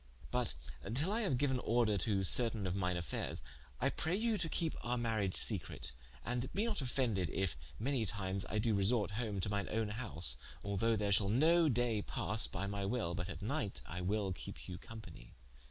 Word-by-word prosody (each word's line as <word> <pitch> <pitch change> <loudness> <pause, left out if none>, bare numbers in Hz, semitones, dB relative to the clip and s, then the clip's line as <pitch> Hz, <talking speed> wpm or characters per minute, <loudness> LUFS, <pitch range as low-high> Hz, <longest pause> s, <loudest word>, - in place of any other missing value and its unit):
But - - 0 0.4
till 155 +9 +3
I 225 +2 +1
haue 190 - +1
giuen 130 -1 +1
order 115 -2 +3
to 100 0 +1
certaine 115 0 +3
of 90 0 -1
mine 90 -2 0
affaires, 85 - -4 0.4
I - - +2
praye 175 +5 -1
you 230 0 +2
to 165 - -1
kepe 165 -1 0
our 125 +1 -1
mariage 110 -5 0
secrete, - - +2 0.3
and 125 +1 -2
bee 205 +3 +2
not 220 -8 -1
offended 120 - 0
if 95 -1 -1 0.2
many 120 -2 0
times 95 -1 -3
I 110 - -1
do 110 +1 +2
resorte 100 +2 +2
home 105 -2 -2
to 100 - 0
mine 100 -1 -1
own 110 -1 0
house, 90 - +2 0.3
although 105 +3 +1
ther 100 -1 0
shall 100 0 +4
no 160 +8 +5
day 120 -4 +1
passe 110 +2 +2
(by 95 +2 -2
my 100 0 -2
wil) 100 -4 -1
but 90 +2 -3
at 95 - -6
night 115 -3 -2
I 90 +2 -5
wil 100 +1 0
kepe 85 - -8
you 90 -1 -7
companie. 110 - -11
110 Hz, 195 wpm, -36 LUFS, 95-125 Hz, 0.4 s, no